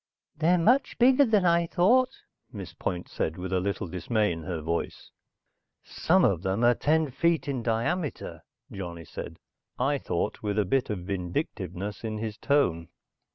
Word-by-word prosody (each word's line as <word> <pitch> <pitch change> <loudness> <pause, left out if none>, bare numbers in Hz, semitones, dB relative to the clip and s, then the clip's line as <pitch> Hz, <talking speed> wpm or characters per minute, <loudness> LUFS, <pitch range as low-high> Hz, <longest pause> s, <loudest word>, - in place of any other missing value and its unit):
"They're 165 +4 +3
much 245 +11 +2
bigger 260 +3 +6
than 210 -5 +2
I 170 0 +3
thought," 250 +11 +4 0.4
Miss 100 -7 -8
Point 90 -1 -4
said 80 - -3
with 90 +1 -4
a 95 - +2
little 100 +1 -2
dismay 95 +5 0
in 85 -1 -5
her 90 -3 -3
voice. 85 +2 -4 0.7
"Some 180 +2 +2
of 90 -4 +1
them 95 +5 -1
are 120 0 +6
ten 155 +3 +1
feet 165 +4 +1
in 135 -3 -2
diameter," 120 +8 -2 0.3
Johnny 85 -4 -7
said, - - -8 0.4
I - - +1
thought - - -2
with 105 -1 -2
a 105 - +2
bit 130 +7 0
of 95 -5 -4
vindictiveness 95 - -4
in 110 -1 -3
his 110 -1 -4
tone. 90 - +1
110 Hz, 160 wpm, -27 LUFS, -, 0.7 s, bigger